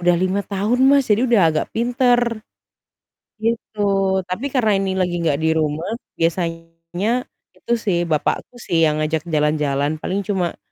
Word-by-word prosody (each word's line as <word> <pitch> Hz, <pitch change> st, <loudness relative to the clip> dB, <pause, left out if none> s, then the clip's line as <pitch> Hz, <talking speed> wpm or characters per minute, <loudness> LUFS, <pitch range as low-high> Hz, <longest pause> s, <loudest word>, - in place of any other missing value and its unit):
Udah 175 Hz, 0 st, +3 dB
5 185 Hz, +3 st, 0 dB
tahun 205 Hz, +5 st, 0 dB
Mas, 275 Hz, -4 st, +4 dB
jadi 230 Hz, +5 st, +3 dB
udah 235 Hz, -4 st, +4 dB
agak 155 Hz, -, -1 dB
pinter, 240 Hz, 0 st, +2 dB, 1.0 s
gitu. 225 Hz, 0 st, -3 dB, 0.5 s
Tapi 185 Hz, +9 st, -4 dB
karena 235 Hz, -6 st, +2 dB
ini 195 Hz, -, -1 dB
lagi 180 Hz, -2 st, 0 dB
gak 150 Hz, -4 st, +1 dB
di 160 Hz, 0 st, +1 dB
rumah, 155 Hz, +1 st, -1 dB, 0.3 s
biasanya 165 Hz, +6 st, -2 dB, 0.3 s
itu -, -, -8 dB
sih 185 Hz, -4 st, +2 dB
bapakku 155 Hz, +9 st, -1 dB
sih 165 Hz, -1 st, +1 dB
yang 155 Hz, -1 st, +3 dB
ngajak 155 Hz, +1 st, -1 dB
jalan-jalan, 150 Hz, -2 st, +1 dB
paling 195 Hz, +1 st, -2 dB
cuma, 190 Hz, -4 st, -1 dB
185 Hz, 145 wpm, -20 LUFS, 160-225 Hz, 1.0 s, Mas